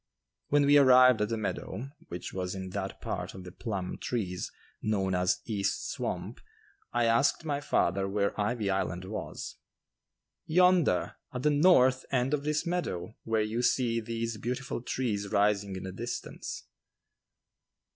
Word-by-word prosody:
When 145 Hz, 0 st, +4 dB
we 145 Hz, +1 st, +7 dB
arrived 130 Hz, -3 st, +7 dB
at 105 Hz, -, +1 dB
the 115 Hz, -, -1 dB
meadow, 110 Hz, +4 st, -4 dB, 0.2 s
which 85 Hz, -, -6 dB
was 90 Hz, 0 st, -3 dB
in 95 Hz, -1 st, -6 dB
that 95 Hz, 0 st, -4 dB
part -, -, -4 dB
of 95 Hz, -, -8 dB
the 90 Hz, -, -9 dB
"Plum 95 Hz, -3 st, -4 dB
Trees" 95 Hz, -7 st, -3 dB, 0.3 s
known 95 Hz, -3 st, 0 dB
as 90 Hz, 0 st, +1 dB
"East 100 Hz, -4 st, -1 dB
Swamp," -, -, -4 dB, 0.5 s
I 120 Hz, 0 st, +2 dB
asked 115 Hz, +8 st, +3 dB
my 145 Hz, -2 st, -1 dB
father 95 Hz, -8 st, +1 dB
where 100 Hz, +1 st, 0 dB
"Ivy 105 Hz, -1 st, 0 dB
Island" 95 Hz, -1 st, -1 dB
was. 105 Hz, +3 st, -6 dB, 0.9 s
"Yonder, 180 Hz, -, +3 dB
at 125 Hz, -, -5 dB
the 150 Hz, -, +4 dB
north 145 Hz, -5 st, +5 dB
end 130 Hz, +1 st, +1 dB
of 145 Hz, -1 st, 0 dB
this 150 Hz, +2 st, 0 dB
meadow, 115 Hz, -, -2 dB
where 110 Hz, -1 st, +1 dB
you 110 Hz, +3 st, -1 dB
see 120 Hz, -2 st, +2 dB
those 115 Hz, 0 st, -3 dB
beautiful 125 Hz, +3 st, -3 dB
trees 115 Hz, -5 st, -2 dB
rising 100 Hz, -1 st, +2 dB
in 95 Hz, -, -6 dB
the 95 Hz, -, -5 dB
distance." 115 Hz, +6 st, -5 dB
115 Hz, 150 wpm, -30 LUFS, 95-130 Hz, 0.9 s, we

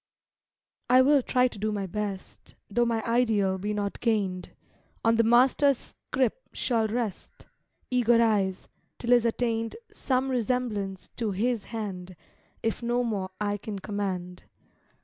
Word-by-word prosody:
I 255 Hz, +1 st, +7 dB
will 285 Hz, +1 st, +5 dB
try 250 Hz, 0 st, +2 dB
to 220 Hz, -, -9 dB
do 215 Hz, +1 st, -1 dB
my 200 Hz, -2 st, -2 dB
best, 200 Hz, 0 st, -6 dB, 0.2 s
Though 240 Hz, +3 st, +2 dB
my 225 Hz, -1 st, 0 dB
ideal 220 Hz, -5 st, +2 dB
be 205 Hz, +3 st, -2 dB
not 205 Hz, -1 st, -2 dB
gained; 195 Hz, -6 st, 0 dB, 0.6 s
On 225 Hz, -, +5 dB
the 230 Hz, -, +4 dB
Master's 255 Hz, +4 st, +4 dB, 0.3 s
scrip 260 Hz, -, +1 dB
shall 230 Hz, -3 st, +1 dB
rest 225 Hz, -3 st, -4 dB, 0.5 s
Eager 240 Hz, -2 st, +4 dB
eyes, 205 Hz, -5 st, +1 dB, 0.3 s
till 240 Hz, -, -2 dB
is 240 Hz, -1 st, +5 dB
attained 230 Hz, -1 st, -1 dB, 0.2 s
Some 260 Hz, 0 st, 0 dB
resemblance 225 Hz, -6 st, -2 dB
to 230 Hz, -3 st, -1 dB
His 225 Hz, +2 st, 0 dB
hand; 190 Hz, -5 st, -6 dB, 0.5 s
If 225 Hz, +1 st, -1 dB
no 240 Hz, +1 st, +1 dB
more 200 Hz, -5 st, -2 dB
I 205 Hz, -1 st, 0 dB
can 205 Hz, 0 st, -6 dB
command. 190 Hz, -3 st, -4 dB
225 Hz, 140 wpm, -27 LUFS, 200-245 Hz, 0.6 s, I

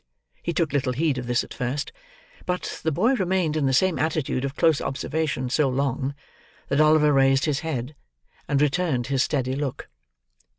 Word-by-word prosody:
He 170 Hz, -, -2 dB
took 165 Hz, -3 st, 0 dB
little 135 Hz, -3 st, 0 dB
heed 145 Hz, 0 st, 0 dB
of 125 Hz, -, -6 dB
this 120 Hz, 0 st, +1 dB
at -, -, -10 dB
first; 130 Hz, +3 st, -3 dB, 0.6 s
but 180 Hz, 0 st, -3 dB
the 160 Hz, -, 0 dB
boy 215 Hz, -, +2 dB
remained 185 Hz, -, 0 dB
in 150 Hz, -3 st, +1 dB
the -, -, +2 dB
same 180 Hz, +7 st, +2 dB
attitude 155 Hz, -5 st, -1 dB
of 140 Hz, 0 st, -3 dB
close 160 Hz, -1 st, +3 dB
observation 140 Hz, -1 st, -2 dB
so 140 Hz, 0 st, +2 dB
long, 135 Hz, +1 st, -1 dB, 0.5 s
that 140 Hz, +2 st, +3 dB
Oliver 155 Hz, -1 st, +5 dB
raised 135 Hz, 0 st, +4 dB
his 150 Hz, -3 st, 0 dB
head, 140 Hz, -4 st, -4 dB, 0.5 s
and 140 Hz, -1 st, +1 dB
returned 150 Hz, -4 st, 0 dB
his 135 Hz, -, +2 dB
steady 130 Hz, -2 st, 0 dB
look. 140 Hz, -2 st, -4 dB
145 Hz, 175 wpm, -24 LUFS, 135-160 Hz, 0.6 s, Oliver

